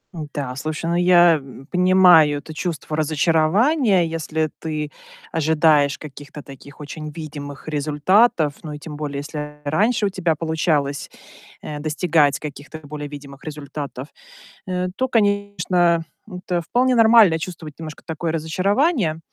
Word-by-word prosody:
Н-да, 145 -4 -5
слушай, 155 +3 -4
ну 170 - 0
я, 175 -1 +5
м, 135 -1 -12
понимаю 180 -5 +5
это 155 - -10
чувство 155 -1 -4
разочарования. 175 - +2
Если 160 -1 -2
ты 155 -2 -4 0.4
ожидаешь 155 -3 +3
каких-то 145 0 -10
таких 140 +2 -13
очень 155 +1 -7
видимых 145 -2 -8
результатов, 155 +3 +2
ну 155 -2 -6
и 150 - -7
тем 150 0 -8
более, 145 -2 -4
если 150 0 -7
раньше 205 +9 +1
у - - -1
тебя 175 -4 0
получалось, 155 -3 -1 0.5
э, 150 -1 -6
достигать 155 -1 +1
каких-то 150 +1 -8
более 145 0 -7
видимых 140 -1 -11
результатов, 145 -3 -7 0.6
э, 180 0 -1
то, 260 - 0
конечно, 200 -6 +1 0.2
это 180 -3 -3
вполне 250 +8 +1
нормально 225 -7 +6
чувствовать 160 -2 -7
немножко 155 -2 -8
такое 160 0 -3
разочарование. 185 - 0
155 Hz, 130 wpm, -21 LUFS, 150-180 Hz, 0.6 s, нормально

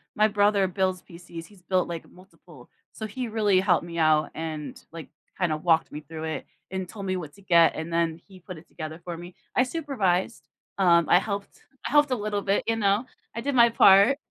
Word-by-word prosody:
My 215 +1 +4
brother 205 -2 +2
builds 185 0 -1
PCs, 170 -1 -11
he's 200 -3 -19
built, 185 0 0
like, 170 -1 -6
multiple. 170 -7 -18 0.2
So 220 - -6
he 240 +3 -5
really 210 -4 +2
helped 180 -3 +2
me 170 -1 -7
out 155 -1 +3
and, 155 -2 -6
like, 165 -1 -9 0.3
kinda 170 -4 0
walked 165 0 +1
me 150 - -6
through 155 +1 -9
it 160 0 -4 0.3
and 190 -1 -4
told 200 +1 -8
me 185 -1 -1
what 155 -5 -7
to 200 - -18
get, 170 -3 +4
and 160 +1 -5
then 165 -1 0
he 190 -2 -15
put 185 0 -10
it 155 - -15
together 155 0 -8
for 175 -2 -6
me. 175 +1 -11 0.2
I 255 - +4
supervised, 250 - -2 0.3
um, 170 -4 +4
I 175 - +6
helped 200 0 -6 0.3
I - - -6
helped 295 -1 +4
a 255 - +1
little 210 -2 -2
bit, 200 0 0
you 225 - 0
know, 205 +3 +1 0.3
I 230 - -3
did 280 +3 -2
my 235 -2 +6
part. 200 +4 +6
185 Hz, 215 wpm, -26 LUFS, 165-205 Hz, 0.3 s, I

